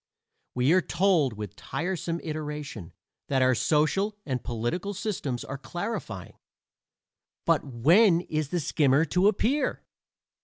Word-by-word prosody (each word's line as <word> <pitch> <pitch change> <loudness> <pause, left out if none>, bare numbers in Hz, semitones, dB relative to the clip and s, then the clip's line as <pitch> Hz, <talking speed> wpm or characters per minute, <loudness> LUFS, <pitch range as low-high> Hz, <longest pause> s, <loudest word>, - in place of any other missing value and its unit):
We 125 +5 +3
are 185 - +5
told 170 - +2
with 105 -3 -7
tiresome 170 -1 -3
iteration 150 - -5 0.4
that 130 -2 +2
our 130 0 +4
social 165 - +1
and 130 -4 -2
political 125 - -3
systems 160 - -3
are 135 0 -6
clarifying; 135 - -5 1.1
but - - +3
when 165 - +4
is 155 -4 -3
the 175 - 0
skimmer 145 +1 +3
to 180 +5 +2
appear? 230 +8 +1
155 Hz, 120 wpm, -27 LUFS, 130-185 Hz, 1.1 s, are